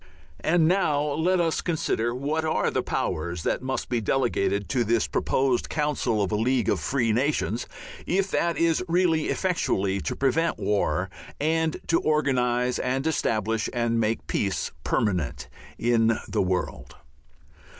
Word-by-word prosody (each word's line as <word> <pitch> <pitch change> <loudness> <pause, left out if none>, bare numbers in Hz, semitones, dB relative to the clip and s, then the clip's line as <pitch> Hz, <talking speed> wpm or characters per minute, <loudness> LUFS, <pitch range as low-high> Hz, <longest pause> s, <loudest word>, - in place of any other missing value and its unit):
And 165 -1 +3
now 175 -5 +2
let 175 +5 +1
us 165 -2 +1
consider 120 -8 -1
what 150 +5 -1
are 160 0 +1
the - - 0
powers 85 +1 -2
that - - 0
must 130 +1 -3
be 120 -2 -1
delegated 105 -5 0
to 125 -3 +1
this 115 0 +1
proposed 130 -2 0
council 145 -8 0
of 100 - -2
a - - +1
League 120 +2 +1
of - - +1
Free 125 -5 0
Nations, 125 -2 0 0.4
if 195 +2 +1
that 170 -1 +1
is 165 +1 +2
really 165 -2 +2
effectually 100 - 0
to - - -3
prevent 155 +5 +1
war 105 0 0 0.3
and 160 +1 +1
to 165 - +2
organize 125 -5 +1
and 130 +2 -1
establish 110 -8 0
and 120 -1 0
make 110 0 0
peace 95 -3 -1
permanent 90 -9 -1 0.3
in 115 -1 +2
the - - 0
world. 90 -1 -2
125 Hz, 145 wpm, -26 LUFS, 110-160 Hz, 0.4 s, And